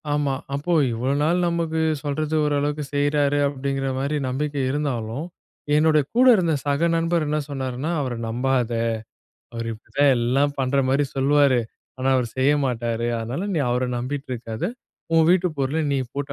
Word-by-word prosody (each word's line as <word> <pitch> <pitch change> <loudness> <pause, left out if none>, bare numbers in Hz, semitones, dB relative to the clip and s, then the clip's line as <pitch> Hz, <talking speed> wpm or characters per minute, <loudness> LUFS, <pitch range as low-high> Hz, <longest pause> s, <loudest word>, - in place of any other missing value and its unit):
ஆமா, 145 -2 +1 0.2
அப்போ 145 +5 -1 0.2
இவ்ளோ 120 +4 -1
நாள் 175 +3 +2
நமக்கு 165 -1 -1 0.2
சொல்றது 150 +2 -2
ஓரளவுக்கு 145 0 0
செய்றாரு 145 0 +2
அப்டிங்கிற 135 -1 -2
மாரி 140 +3 -1
நம்பிக்கை 145 +2 -2
இருந்தாலும், 135 -2 -2 0.5
என்னுடைய 155 -1 +4
கூட 250 +2 +5
இருந்த 170 -5 +1
சக 145 +4 +2
நண்பர் 165 -1 +1
என்ன 150 +1 0
சொன்னாருன்னா 135 +2 -3
அவர 130 -3 -2
நம்பாத, 125 +1 0 0.8
அவரு 115 0 -4
இப்டித்தான் 135 +5 +1
எல்லாம் 135 +4 +1
பண்ற 135 +1 +1
மாரி 140 +2 +2
சொல்லுவாரு. 140 -1 +4 0.4
ஆனா, 130 +1 0
அவரு 125 -2 0
செய்ய 135 +2 +4
மாட்டாரு, 120 -1 -2
அதனால 125 - -3
நீ - - +1
அவர 125 +1 0 0.2
நம்பிட்டு 135 +3 -4
இருக்காத, 115 -2 -5 0.5
உன் 160 -1 +5
வீட்டு 180 0 +3
பொருள 135 +2 0 0.2
நீ - - +1 0.2
போட்டு 140 0 -4
140 Hz, 150 wpm, -23 LUFS, 130-150 Hz, 0.8 s, கூட